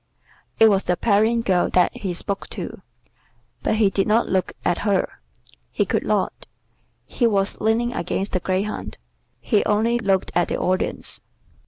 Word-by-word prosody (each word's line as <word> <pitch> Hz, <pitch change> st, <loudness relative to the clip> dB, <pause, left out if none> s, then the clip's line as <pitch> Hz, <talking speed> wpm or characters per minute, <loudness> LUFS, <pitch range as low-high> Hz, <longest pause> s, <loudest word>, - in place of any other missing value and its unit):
It 225 Hz, -, +8 dB
was 200 Hz, -2 st, +2 dB
the 180 Hz, -, +1 dB
Parian 225 Hz, +2 st, +2 dB
girl 180 Hz, -4 st, +2 dB
that 180 Hz, -, +2 dB
he 185 Hz, -4 st, -4 dB
spoke 200 Hz, +3 st, -4 dB
to, -, -, -7 dB, 0.8 s
but -, -, 0 dB
he 210 Hz, -3 st, +3 dB
did 195 Hz, 0 st, 0 dB
not 220 Hz, +2 st, +3 dB
look 185 Hz, -1 st, 0 dB
at 175 Hz, -, +1 dB
her; 200 Hz, -3 st, 0 dB, 0.5 s
he -, -, 0 dB
could -, -, 0 dB
not, -, -, -1 dB, 0.6 s
he 240 Hz, -, +1 dB
was 195 Hz, -3 st, 0 dB
leaning 230 Hz, +3 st, +1 dB
against 195 Hz, -1 st, -2 dB
the 185 Hz, -, 0 dB
greyhound; 190 Hz, +4 st, -3 dB, 0.4 s
he 210 Hz, -4 st, +1 dB
only 225 Hz, +3 st, +2 dB
looked 195 Hz, -4 st, 0 dB
at 175 Hz, 0 st, +2 dB
the -, -, -2 dB
Audience. 185 Hz, +1 st, -2 dB
200 Hz, 160 wpm, -22 LUFS, 185-220 Hz, 0.8 s, It